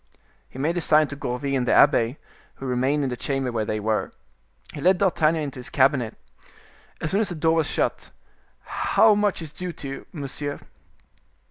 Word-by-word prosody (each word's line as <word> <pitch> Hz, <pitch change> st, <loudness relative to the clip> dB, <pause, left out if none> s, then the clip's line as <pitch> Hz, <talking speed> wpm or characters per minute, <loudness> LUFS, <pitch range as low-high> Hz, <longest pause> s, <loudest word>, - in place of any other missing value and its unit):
He -, -, -13 dB
made 160 Hz, +6 st, 0 dB
a -, -, 0 dB
sign 155 Hz, -1 st, +4 dB
to 145 Hz, -, -6 dB
Gourville 140 Hz, 0 st, -3 dB
and 125 Hz, -2 st, 0 dB
the -, -, +3 dB
abbe, 130 Hz, -2 st, +4 dB, 0.4 s
who 135 Hz, -, -9 dB
remained 130 Hz, +3 st, +1 dB
in 130 Hz, -, -1 dB
the -, -, -2 dB
chamber 135 Hz, +1 st, -2 dB
where 110 Hz, -2 st, -1 dB
they 110 Hz, 0 st, -2 dB
were. 110 Hz, +1 st, -1 dB, 0.6 s
He 145 Hz, -, -7 dB
led 185 Hz, +3 st, +4 dB
D'Artagnan 165 Hz, -4 st, +2 dB
into 140 Hz, -2 st, -6 dB
his 125 Hz, -, -6 dB
cabinet. 130 Hz, -4 st, +2 dB, 0.8 s
As 155 Hz, -, -3 dB
soon 200 Hz, +3 st, +2 dB
as 210 Hz, -, 0 dB
the 175 Hz, -, -4 dB
door 160 Hz, +1 st, +2 dB
was 160 Hz, -2 st, +1 dB
shut,—"how 220 Hz, -1 st, 0 dB
much 205 Hz, -4 st, 0 dB
is 155 Hz, -, -8 dB
due 180 Hz, +1 st, -5 dB
to 140 Hz, -, -8 dB
you, 135 Hz, 0 st, -7 dB
monsieur?" 145 Hz, -3 st, -4 dB
145 Hz, 190 wpm, -24 LUFS, 130-165 Hz, 0.8 s, sign